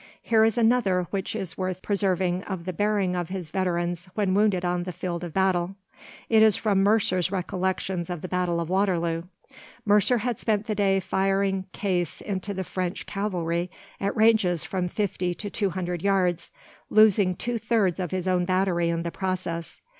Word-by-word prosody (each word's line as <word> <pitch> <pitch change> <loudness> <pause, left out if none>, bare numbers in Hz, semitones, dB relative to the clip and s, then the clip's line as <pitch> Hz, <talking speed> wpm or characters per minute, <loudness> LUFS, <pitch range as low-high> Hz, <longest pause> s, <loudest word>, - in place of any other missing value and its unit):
Here 220 -2 +4
is 225 +2 +2
another 225 -6 +3
which 195 +1 -3
is 195 -5 -5
worth 185 -1 -3
preserving 185 -3 0
of 185 -4 -5
the 185 - -3
bearing 200 -1 +1
of 175 -2 -3
his 185 -4 -5
veterans 175 -1 -1
when 200 -3 +1
wounded 200 -3 +2
on 175 0 0
the 180 +1 -4
field 175 0 -4
of 175 - -5
battle. 190 0 +1 0.5
It 220 -1 +5
is 220 -3 +6
from 200 -3 +1
Mercer's 195 -3 +2
recollections 185 -1 -2
of 175 -3 -4
the - - -5
Battle 180 -2 0
of 170 - -2
Waterloo. 175 -3 +1 0.6
Mercer 210 +4 +4
had 235 0 -2
spent 215 -2 0
the 220 - -1
day 195 -2 +2
firing 195 0 0
case 180 -5 -2
into 200 0 -4
the 190 -1 -3
French 185 0 -4
cavalry 180 -4 -2 0.3
at 200 +3 -2
ranges 215 -7 +3
from 185 -2 -2
fifty 180 -3 -2
to 205 +1 -6
two 200 -3 0
hundred 180 -2 -3
yards, 180 -3 +1 0.4
losing 205 -4 +5
two 240 +4 -3
thirds 215 -6 +1
of 180 -2 -2
his 185 +1 -3
own 180 -1 +2
battery 185 -2 +1
in 170 0 -1
the 170 - -3
process. 180 -3 -4
185 Hz, 175 wpm, -26 LUFS, 175-205 Hz, 0.6 s, is